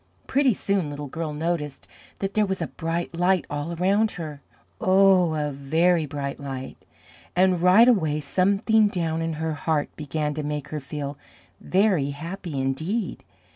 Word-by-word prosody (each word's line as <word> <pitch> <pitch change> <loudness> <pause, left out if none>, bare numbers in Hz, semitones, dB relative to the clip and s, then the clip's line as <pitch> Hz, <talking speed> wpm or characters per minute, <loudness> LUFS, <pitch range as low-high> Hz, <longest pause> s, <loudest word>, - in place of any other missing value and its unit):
Pretty 265 -4 +2
soon 195 -6 0
Little 145 0 -6
Girl 160 +3 -4
noticed 150 -2 -3 0.3
that 195 0 -3
there 215 -1 +2
was 190 0 -2
a - - -1
bright 170 +1 -3
light 180 +1 +2
all 145 +4 -3
around 200 +5 +2
her 150 -4 -6 0.4
oh, 185 -3 +4
a 150 -1 -1
very 160 +4 +2
bright 140 -1 -4
light 135 -2 -6 0.6
and 180 -1 +3
right 185 +7 +7
away 160 -11 +3
something 200 +8 +3
down 165 -5 -1
in 165 0 -1
her 160 +1 -2
heart 150 0 -1
began 150 0 -2
to 155 - -3
make 150 -1 -4
her 155 - -3
feel 140 0 -6 0.4
very 185 -7 +2
happy 165 +1 -5
indeed. 160 - -2
165 Hz, 155 wpm, -25 LUFS, 145-190 Hz, 0.6 s, right